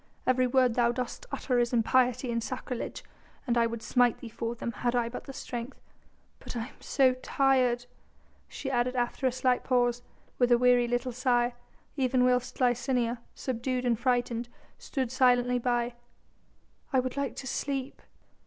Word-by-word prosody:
Every 255 0 +3
word 255 -1 +3
thou 235 0 +3
dost 250 - -5
utter 250 -3 0
is 240 0 +1
impiety 245 +1 +2
and 230 0 -1
sacrilege, 250 -1 -5 0.4
and 240 -3 +1
I 235 -1 +3
would 230 -1 -6
smite 245 -2 +3
thee 235 - -9
for 230 +1 -4
them 235 - -4
had 240 +2 -1
I 235 -1 +1
but 240 - -7
the 275 - -7
strength. 245 -1 -6 0.6
"But - - -8
I 230 +3 -4
am - - -20
so 265 -2 +3
tired," 255 -2 +1 0.6
she 270 - -5
added 250 0 +1
after 245 +2 0
a - - +2
slight 255 0 +1
pause, 245 -1 +1 0.4
with 245 -1 +3
a 240 - +7
weary 245 0 +4
little 245 +1 -1
sigh, 245 -1 +1 0.4
even 255 -1 +2
whilst 250 -1 +1
Licinia, 245 -1 +1 0.2
subdued 255 0 -2
and 235 -2 +1
frightened, 240 -1 0 0.3
stood 260 -4 -3
silently 250 -1 +3
by: 240 0 0 1.0
"I 265 - +3
would 255 0 -2
like 280 -1 -2
to - - -7
sleep." 270 +1 -3
245 Hz, 165 wpm, -29 LUFS, 240-255 Hz, 1.0 s, a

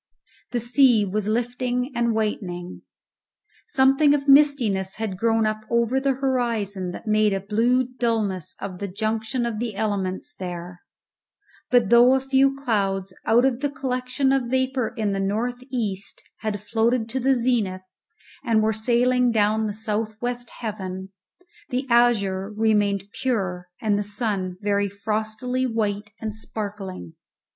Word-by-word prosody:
The 245 - -1
sea 240 -2 +4
was 205 +1 -2
lifting 245 +3 -1
and 235 -1 +1
whitening; 180 -5 -3 0.9
something 275 -4 +4
of 280 0 -3
mistiness 260 -10 +4
had 215 -4 -3
grown 225 +2 +2
up 215 0 -1
over 235 +2 +2
the 270 0 +1
horizon 230 -8 -1
that 180 - -8
made 215 -1 +3
a 195 - 0
blue 225 +6 +2
dulness 225 -8 -1
of 185 -2 -6
the 200 - -3
junction 220 +5 -2
of 225 -3 -3
the 230 -3 -3
elements 195 -3 -2
there; 175 -1 -7 0.9
but 240 -5 +3
though 240 +2 +7
a - - +2
few 270 +1 +2
clouds 195 -8 -1
out 240 +3 +5
of 255 -2 +1
the 285 +1 0
collection 265 0 -1
of 265 -3 +1
vapour 260 -1 0
in 215 -2 0
the 195 - -1
north 230 +6 -2
east 205 -6 -3
had 210 -2 -3
floated 225 +3 0
to 260 +3 -2
the 265 +1 +3
zenith 220 -7 0 0.6
and 225 -4 +2
were 220 0 +2
sailing 245 +3 +2
down 215 0 +2
the - - -2
south 215 0 -3
west 245 0 -3
heaven, 190 -4 -5 0.6
the 255 +2 -1
azure 205 -5 +3
remained 210 -2 +1 0.2
pure 190 -8 -1
and 210 -2 +1
the - - -1
sun 205 -3 -2
very 200 -1 +1
frostily 220 +5 -2
white 210 -3 -2
and 220 -1 -4
sparkling. 200 - -6
220 Hz, 145 wpm, -24 LUFS, 200-250 Hz, 0.9 s, though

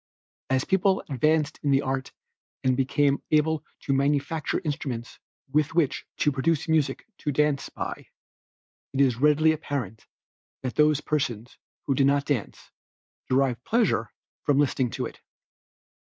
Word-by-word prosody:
As 130 0 +1
people 190 0 +2
advanced 150 +3 +1
in 145 - -1
the 135 0 +3
art 135 0 -2 0.5
and 130 -1 +3
became 140 +1 +2
able 155 0 +2 0.2
to 135 - -1
manufacture 145 +3 0
instruments 130 -5 -4 0.3
with 150 +2 +1
which 160 -6 +1
to 150 - +2
produce 150 +4 0
music 155 -4 +1
to 150 - -1
dance 150 0 +1
by, - - -6 0.9
it 135 - -2
is 130 -4 +3
readily 150 +3 +4
apparent 135 -9 -4 0.6
that 130 - -2
those 150 -1 +3
persons 125 -6 -2 0.3
who 140 - +1
did 135 0 +3
not 140 0 +2
dance, 140 -8 -3 0.6
derived 130 -2 +1
pleasure 210 - +1 0.3
from 145 -2 +2
listening 135 -3 +2
to - - -3
it. - - -9
140 Hz, 135 wpm, -26 LUFS, 130-150 Hz, 0.9 s, readily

